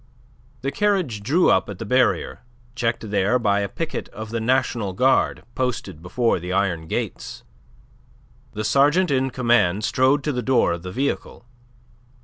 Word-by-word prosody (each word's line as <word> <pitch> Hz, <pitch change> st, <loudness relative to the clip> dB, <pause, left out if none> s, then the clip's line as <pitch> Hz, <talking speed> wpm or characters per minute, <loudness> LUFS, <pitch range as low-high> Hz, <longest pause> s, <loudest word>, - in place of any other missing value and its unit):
The 135 Hz, +2 st, -2 dB
carriage 185 Hz, -, 0 dB
drew 150 Hz, -, +3 dB
up -, -, +2 dB
at 100 Hz, -, -6 dB
the 115 Hz, -, -6 dB
barrier, 125 Hz, +3 st, +1 dB, 0.3 s
checked 115 Hz, -3 st, -2 dB
there 105 Hz, +4 st, +2 dB
by 100 Hz, -4 st, +1 dB
a 100 Hz, -1 st, -2 dB
picket 165 Hz, +8 st, -5 dB
of 110 Hz, +1 st, -8 dB
the 115 Hz, -, -2 dB
National 120 Hz, -4 st, 0 dB
Guard 130 Hz, +8 st, +2 dB
posted 120 Hz, -11 st, -3 dB
before 115 Hz, +5 st, 0 dB
the 90 Hz, +2 st, -6 dB
iron 90 Hz, -4 st, 0 dB
gates. -, -, -4 dB, 1.1 s
The 105 Hz, -, -4 dB
sergeant 145 Hz, -, +3 dB
in 135 Hz, -1 st, +1 dB
command 120 Hz, -6 st, +2 dB
strode 130 Hz, +5 st, +2 dB
to 150 Hz, -, 0 dB
the 125 Hz, -2 st, -2 dB
door 130 Hz, -8 st, +2 dB
of 85 Hz, -, -5 dB
the 90 Hz, +1 st, -7 dB
vehicle. 135 Hz, 0 st, -3 dB
120 Hz, 155 wpm, -22 LUFS, 100-130 Hz, 1.1 s, drew